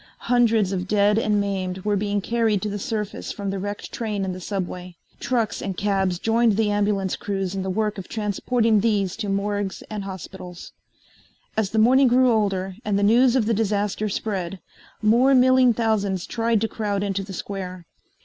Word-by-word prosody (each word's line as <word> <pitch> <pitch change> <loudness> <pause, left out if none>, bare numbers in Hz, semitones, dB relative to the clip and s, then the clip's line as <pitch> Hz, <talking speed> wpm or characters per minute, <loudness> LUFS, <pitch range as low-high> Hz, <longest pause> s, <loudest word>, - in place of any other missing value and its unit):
Hundreds 230 -5 +2
of 185 -1 -2
dead 205 +1 +3
and 210 -2 +1
maimed 190 -2 -3
were 210 -1 +2
being 205 0 -1
carried 225 -1 +1
to 210 - -3
the 205 0 -4
surface 210 0 -4
from 200 -2 -4
the 195 - -3
wrecked 205 +1 -5
train 210 -4 -3
in 190 - -2
the 185 - -8
subway. 180 -2 -5 0.2
Trucks 240 -3 -1
and 190 -2 -4
cabs 195 -3 0
joined 225 +1 +2
the 215 -2 +2
ambulance 205 -2 0
crews 195 -2 -3
in 195 - -3
the 190 - -3
work 210 +1 -1
of 185 - -8
transporting 220 +1 +1
these 200 -4 +1
to 205 - -4
morgues 200 0 -2
and 210 -2 -4
hospitals. 185 -2 -9 0.8
As 215 -3 0
the 220 - -3
morning 255 +5 +5
grew 250 +1 +4
older 195 -4 0
and 205 -1 0
the 200 - +1
news 240 +4 +5
of 245 -5 +2
the 230 - +1
disaster 210 0 0
spread, 190 -3 -3 0.4
more 245 +5 +5
milling 255 0 +5
thousands 205 -5 0
tried 230 -2 0
to 225 - +1
crowd 205 -3 -2
into 200 -1 -1
the 195 0 -8
square. 185 -2 -6
205 Hz, 185 wpm, -23 LUFS, 195-225 Hz, 0.8 s, morning